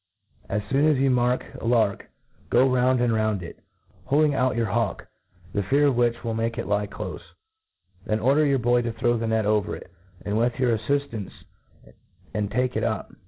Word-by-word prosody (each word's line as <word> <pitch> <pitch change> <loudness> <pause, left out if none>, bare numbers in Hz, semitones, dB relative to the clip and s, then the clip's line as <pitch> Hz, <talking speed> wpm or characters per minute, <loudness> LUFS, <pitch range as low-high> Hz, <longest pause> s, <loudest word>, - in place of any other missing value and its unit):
As 105 +1 -1
foon 140 +3 +3
as 150 - +3
you 135 0 +2
mark 125 0 +1
a - - -9
'^k, 115 -4 +1 0.4
go 130 +2 +4
raund 125 0 +2
and 120 -2 +2
round 110 -4 0
it, 85 - -10 0.5
heading 150 +1 +3
out 130 -2 +1
your 115 0 +1
,b?iwk, 110 +1 -1 0.5
the 100 - 0
fear 140 +9 +2
.of 140 -3 +3
which 120 -1 +2
wiU 115 -1 -2
make 115 +1 -2
it - - -3
lie 105 0 0
ciofe. 100 - -6 0.8
Then 110 0 0
order 140 +6 +3
your 140 -2 +3
boy 120 0 +2
tp 115 -1 -4
throw 120 -2 +2
the 115 - -2
net 110 -1 +1
over 105 -2 0
it^ - - -12 0.5
with 115 +2 +1
your 125 -2 +3
af&itancc, 115 -2 -2 1.0
and 105 -2 -1
take 125 +2 -1
it - - 0
up.. - - -2
120 Hz, 190 wpm, -25 LUFS, 110-130 Hz, 1.0 s, go